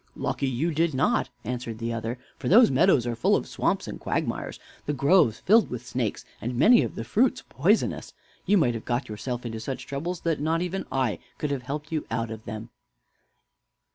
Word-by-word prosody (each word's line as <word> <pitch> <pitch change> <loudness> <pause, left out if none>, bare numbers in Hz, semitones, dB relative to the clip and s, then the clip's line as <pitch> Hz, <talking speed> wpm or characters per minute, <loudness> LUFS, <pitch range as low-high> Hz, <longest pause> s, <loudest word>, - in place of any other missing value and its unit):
"Lucky 135 - -2
you 140 +7 0
did 160 -1 +1
not," 130 - +2
answered 120 -1 -4
the 115 +1 -3
other; 115 +2 -3 0.2
"for - - -4
those 230 - +7
meadows 135 -2 +4
are 120 -1 -2
full 115 - +3
of - - -1
swamps - - -1
and - - -6
quagmires, - - -2 0.3
the 150 - 0
groves 140 - +3
filled 220 +4 +4
with 125 -1 -6
snakes, 125 -3 -3 0.2
and 120 +2 -3
many 230 - +7
of - - -3
the 115 - -4
fruits 230 - +1
poisonous. 180 - +1 0.4
You 205 - +5
might 125 -9 +3
have 115 - -5
got 120 +2 -1
yourself 120 +3 -4
into 115 -1 -4
such 130 +4 -5
troubles 165 +6 -4
that 165 -3 0
not 165 +3 +1
even 180 +2 -3
I 130 -5 0 0.2
could 150 - -2
have 140 -2 -2
helped 150 +4 -5
you 155 -2 -2
out 115 0 -2
of 110 0 -8
them." 110 +2 -7
130 Hz, 200 wpm, -26 LUFS, 115-165 Hz, 0.4 s, those